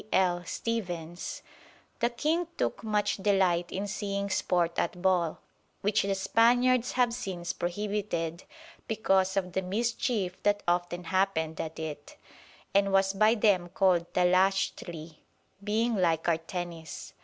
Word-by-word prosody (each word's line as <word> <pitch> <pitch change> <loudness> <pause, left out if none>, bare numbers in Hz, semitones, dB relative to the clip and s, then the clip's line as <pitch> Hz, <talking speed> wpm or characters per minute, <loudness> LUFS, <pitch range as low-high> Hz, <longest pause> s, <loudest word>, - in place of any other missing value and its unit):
L. 175 -2 +2
Stephens): 175 -7 -4 0.6
"The 235 - +2
King 310 +8 0
took - - -1
much 210 -1 0
delight 190 -3 +2
in 195 +2 -2
seeing 200 -1 -3
Sport 175 -2 +1
at 180 - -1
Ball, 175 -3 +1 0.4
which 205 +1 +2
the 195 0 0
Spaniards 245 +5 +3
have 245 -2 +2
since 185 -7 -4
prohibited, 175 -3 -3 0.4
because 195 -3 +1
of 180 -2 -1
the 190 - 0
mischief 210 -1 -1
that 205 0 +1
often 175 0 0
happened 175 -4 0
at 160 0 -6
it; 150 -2 -7 0.6
and 200 0 +3
was 195 0 +3
by 215 +3 +4
them 200 -5 +2
called 180 -2 +2
Tlachtli, 180 -3 +1 0.5
being 225 +3 +1
like 165 -4 +1
our 170 -2 +3
Tennis. 165 -1 -7
190 Hz, 130 wpm, -29 LUFS, 175-210 Hz, 0.6 s, by